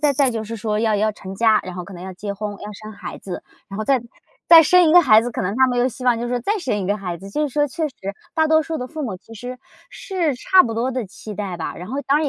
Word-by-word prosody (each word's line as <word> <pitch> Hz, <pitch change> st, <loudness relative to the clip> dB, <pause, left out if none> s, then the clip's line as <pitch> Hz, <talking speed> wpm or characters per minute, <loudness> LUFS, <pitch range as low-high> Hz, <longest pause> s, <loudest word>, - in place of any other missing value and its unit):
再 295 Hz, -2 st, +3 dB
再 270 Hz, -1 st, +2 dB
就 225 Hz, -2 st, -3 dB
是 225 Hz, +1 st, -6 dB
说 210 Hz, 0 st, -1 dB
要 220 Hz, -2 st, +2 dB
要 215 Hz, +1 st, +1 dB
成 190 Hz, -1 st, -9 dB
家， 220 Hz, 0 st, +4 dB
然 185 Hz, -1 st, -7 dB
后 180 Hz, -1 st, -6 dB
可 195 Hz, -, -11 dB
能 175 Hz, -, -9 dB
要 190 Hz, 0 st, -7 dB
结 200 Hz, +2 st, -5 dB
婚、 210 Hz, +1 st, -4 dB
要 210 Hz, -, -7 dB
生 215 Hz, +1 st, -10 dB
孩 200 Hz, -, -8 dB
子， 185 Hz, -2 st, -7 dB, 0.3 s
然 195 Hz, +1 st, -7 dB
后 215 Hz, -, -2 dB
再 260 Hz, -2 st, +2 dB, 0.5 s
再 330 Hz, -1 st, +10 dB
生 355 Hz, +1 st, +5 dB
一 -, -, +4 dB
个 355 Hz, -, +9 dB
孩 220 Hz, -6 st, +7 dB
子， 245 Hz, -, -3 dB
可 -, -, -3 dB
能 195 Hz, +5 st, -2 dB
他 260 Hz, 0 st, +5 dB
们 245 Hz, -1 st, -1 dB
又 250 Hz, +2 st, +3 dB
希 255 Hz, +1 st, -9 dB
望 240 Hz, -2 st, +3 dB
就 240 Hz, -, -3 dB
是 245 Hz, 0 st, -1 dB
再 415 Hz, -, 0 dB
生 255 Hz, -, -1 dB
一 190 Hz, -, -3 dB
个 205 Hz, +2 st, +1 dB
孩 180 Hz, -4 st, -5 dB
子。 195 Hz, +3 st, -11 dB
就 300 Hz, -, -1 dB
是 -, -, -15 dB
说 295 Hz, 0 st, +2 dB
确 315 Hz, +2 st, -2 dB
实 270 Hz, -, -18 dB, 0.4 s
大 315 Hz, -1 st, +3 dB
多 315 Hz, 0 st, +4 dB
数 320 Hz, +1 st, -4 dB
的 250 Hz, -, -4 dB
父 310 Hz, +3 st, -6 dB
母， 210 Hz, -8 st, -3 dB
其 225 Hz, +5 st, -15 dB
实 245 Hz, +3 st, -7 dB, 0.3 s
是 345 Hz, -, -2 dB
差 370 Hz, +8 st, +5 dB
不 230 Hz, -, -3 dB
多 235 Hz, +4 st, -1 dB
的 250 Hz, -3 st, -2 dB
期 210 Hz, +2 st, -9 dB
待 195 Hz, -4 st, -4 dB
吧， 165 Hz, -, -4 dB
然 180 Hz, +4 st, -8 dB
后 270 Hz, +3 st, -3 dB
当 285 Hz, +2 st, +4 dB
然 310 Hz, -, 0 dB
230 Hz, 335 characters per minute, -21 LUFS, 205-280 Hz, 0.5 s, 再